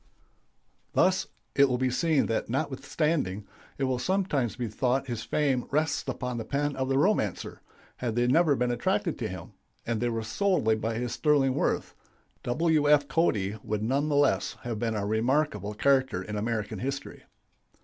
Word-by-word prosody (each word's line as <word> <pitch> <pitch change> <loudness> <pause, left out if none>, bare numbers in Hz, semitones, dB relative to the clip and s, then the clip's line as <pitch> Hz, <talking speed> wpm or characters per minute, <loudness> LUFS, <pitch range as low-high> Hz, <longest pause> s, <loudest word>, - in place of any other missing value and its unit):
] - - -43
Thus - - +3 0.3
it 140 -1 +5
will 125 - +1
be 130 0 0
seen 150 +3 +2
that 115 - -2
notwithstanding 135 - -1 0.3
it 140 - -2
will 130 -2 0
sometimes 150 - 0
be 120 - -3
thought 125 +5 0
his 120 -3 -4
fame 135 0 0
rests 155 +3 0
upon 125 -2 -3
the - - -3
pen 145 +2 -1
of 130 0 -2
the 135 - +2
romancer, 145 - 0 0.4
had 120 -3 -3
they 120 0 +2
never 150 +3 +4
been 125 -1 0
attracted 120 - -1
to - - -2
him - - -8 0.3
and 115 -1 -1
they 120 - +1
were 115 -1 -2
solely 110 - +1
by 110 +1 -2
his 120 +1 -2
sterling 140 -2 +2
worth - - -1 0.5
W. 150 +3 +2
F. 145 -1 +5
Cody 110 - 0
would 105 0 -2
none 140 +6 +1
the 145 - +1
less 145 -1 +2
have 120 -4 -3
been 115 -1 -1
a 100 -1 -1
remarkable 110 0 0
character 130 -6 +2
in 105 +2 -6
American 110 -1 -2
history. 135 +4 -5
130 Hz, 175 wpm, -28 LUFS, 115-145 Hz, 0.5 s, it